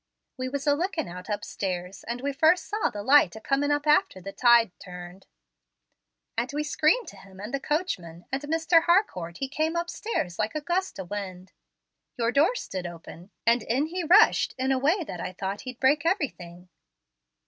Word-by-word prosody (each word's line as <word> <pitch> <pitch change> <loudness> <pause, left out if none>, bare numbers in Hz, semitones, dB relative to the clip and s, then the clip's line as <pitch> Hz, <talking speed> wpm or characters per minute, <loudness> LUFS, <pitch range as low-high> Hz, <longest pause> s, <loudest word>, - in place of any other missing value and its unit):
We 255 -1 -4
was 275 +1 -4
a 290 - +4
lookin' 330 0 -2
out 180 +3 -9
upstairs, 185 -3 -4
and 240 +1 -4
we 280 +1 -2
first 315 +5 +3
saw 425 +1 -1
the 205 - -6
light 265 -8 +5
a - - -7
coming 275 +5 0
up 290 0 0
after 300 -10 +3
the 195 +2 -7
tide 235 -2 +5
turned, 180 +1 -10 1.1
and 235 +3 -1
we 300 +1 -1
screamed 310 +9 +2
to - - -14
him 190 -1 -15
and 210 +5 -7
the 275 - 0
coachman, 195 - -3
and 270 +1 -1
Mr. 325 +2 +2
Harcourt 185 - +1
he 270 - -3
came 310 +4 -1
upstairs 340 - -3
like 215 +4 -1
a 305 - -1
gust 355 - -2
o' - - -3
wind. 185 -1 -7 0.7
Your 230 -1 +1
door 300 - +3
stood 185 - -5
open, 170 +1 -11 0.2
and 235 +1 +4
in 255 +7 0
he 350 +3 -4
rushed 370 +7 +5
in 260 +1 0
a 265 - +2
way 325 +8 +2
that 180 - -7
I 185 - -5
thought 195 +2 -4
he'd 250 - -9
break 285 +3 +3
everything." 185 - -3
260 Hz, 190 wpm, -26 LUFS, 190-310 Hz, 1.1 s, light